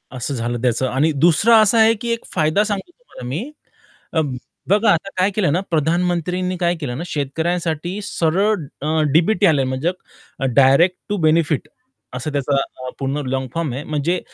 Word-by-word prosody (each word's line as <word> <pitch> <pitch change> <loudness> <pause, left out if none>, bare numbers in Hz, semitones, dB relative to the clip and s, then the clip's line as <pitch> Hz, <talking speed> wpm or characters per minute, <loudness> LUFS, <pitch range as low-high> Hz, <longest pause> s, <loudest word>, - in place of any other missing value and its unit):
असं 130 +3 -3
झालं 120 -1 -3
त्याचं 125 +1 +1
आणि 140 +5 +1
दुसरं 170 +9 +3
असं 215 +2 +3
आहे 225 0 +6
की 235 - -3
एक 230 - -6
फायदा 160 +4 +2
सांगतो 210 - -4
तुम्हाला 350 - -12
मी, 170 - -4 0.6
अ, 160 - +2 0.5
बघा 210 +3 +4
आता 170 +4 0
काय 185 +2 +3
केलं 180 -9 +1
ना, 175 - +2
प्रधानमंत्रींनी 175 +3 0
काय 175 0 +1
केलं 125 -4 -4
ना, 165 - -4
शेतकऱ्यांसाठी 165 +4 -2
सरळ 195 +4 +1 0.3
अ, 145 - -3 0.3
डी-बी-टी 185 +6 +3
आले 150 -7 +4
म्हणजे 130 +6 -1 0.6
डायरेक्ट 140 +7 +5
टू 205 - -1
बेनिफिट 155 -2 +1 0.5
असं 135 +5 -4
त्याचा 140 0 0 0.4
पूर्ण 135 +2 -2
लाँग 130 0 -2
फॉर्म 165 -6 -2
आहे. 135 +4 -5
म्हणजे 155 +4 -1
165 Hz, 165 wpm, -20 LUFS, 140-185 Hz, 0.6 s, आहे